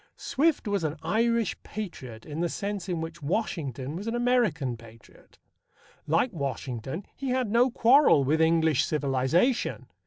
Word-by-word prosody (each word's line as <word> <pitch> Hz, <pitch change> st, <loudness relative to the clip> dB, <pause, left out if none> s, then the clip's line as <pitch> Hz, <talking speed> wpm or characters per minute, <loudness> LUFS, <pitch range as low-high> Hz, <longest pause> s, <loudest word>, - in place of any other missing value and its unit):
Swift 285 Hz, -2 st, 0 dB
was 200 Hz, -3 st, 0 dB
an 155 Hz, 0 st, -2 dB
Irish 230 Hz, +5 st, 0 dB
patriot 130 Hz, -, -7 dB
in 150 Hz, +1 st, -6 dB
the 175 Hz, 0 st, 0 dB
sense 200 Hz, -1 st, -4 dB
in 170 Hz, -2 st, -2 dB
which 165 Hz, 0 st, -7 dB
Washington 145 Hz, -, -3 dB
was 200 Hz, +6 st, -6 dB
an 230 Hz, -, -1 dB
American 225 Hz, -, +1 dB
patriot. 115 Hz, -1 st, -17 dB, 0.7 s
Like 165 Hz, -, +1 dB
Washington, 135 Hz, -, -4 dB
he 270 Hz, -1 st, -4 dB
had 250 Hz, -4 st, 0 dB
no 240 Hz, +3 st, +4 dB
quarrel 245 Hz, -, +5 dB
with 155 Hz, +4 st, +1 dB
English 160 Hz, -3 st, +3 dB
civilization. 150 Hz, -, 0 dB
165 Hz, 145 wpm, -27 LUFS, 140-230 Hz, 0.7 s, quarrel